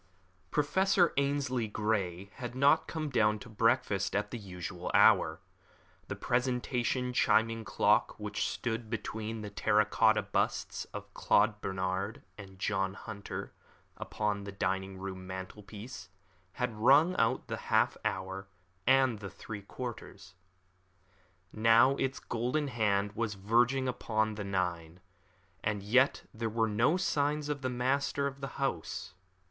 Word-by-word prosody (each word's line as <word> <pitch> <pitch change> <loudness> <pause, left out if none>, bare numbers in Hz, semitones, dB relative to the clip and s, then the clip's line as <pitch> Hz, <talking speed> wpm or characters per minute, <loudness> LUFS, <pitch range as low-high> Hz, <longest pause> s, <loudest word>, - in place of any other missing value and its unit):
Professor 180 - +3
Ainslie 140 -4 0
Grey 100 -3 -2
had 120 -2 -6
not 140 +4 +4
come 155 -3 -3
down 105 -3 +3
to 105 - -11
breakfast 115 -3 +1
at 105 0 -1
the 120 - -4
usual 90 -2 -6
hour. - - +5 0.7
The - - -4
presentation 125 0 0
chiming 115 -1 +2
clock - - +2
which - - -2
stood 115 -1 -3
between 110 0 -4
the 105 -1 -6
terra 105 +1 +3
cotta 110 +1 +3
busts - - -1
of - - -9
Claude 105 0 +2
Bernard 95 +2 -2
and 100 0 -10
of - - -18
John 95 -1 -1
Hunter 100 -2 -7 0.4
upon 105 -1 -2
the 100 - -6
dining 95 0 -2
room 95 -1 -6
mantelpiece 95 0 -8 0.4
had 125 -2 -2
rung 145 +10 +5
out 115 - +2
the - - -3
half - - +3
hour 95 +1 -3 0.4
and 130 -4 +4
the 100 -2 -6
three 100 +2 -8
quarters. 100 -4 -8 1.2
Now 115 +4 +5
its 135 0 -1
golden 125 +5 -1
hand 105 -4 +1
was 115 -2 -2
verging 120 +6 +2
upon 110 -3 0
the 105 0 -5
nine, 90 -3 -2 0.6
and 105 -2 -1
yet 130 +7 +3
there 115 0 -2
were 115 +1 +1
no 115 - +2
signs 150 -4 0
of 145 -2 -2
the 130 - -1
master 135 +3 0
of 140 0 -4
the 135 - -3
house. 135 -11 -3
110 Hz, 135 wpm, -31 LUFS, 100-130 Hz, 1.2 s, hour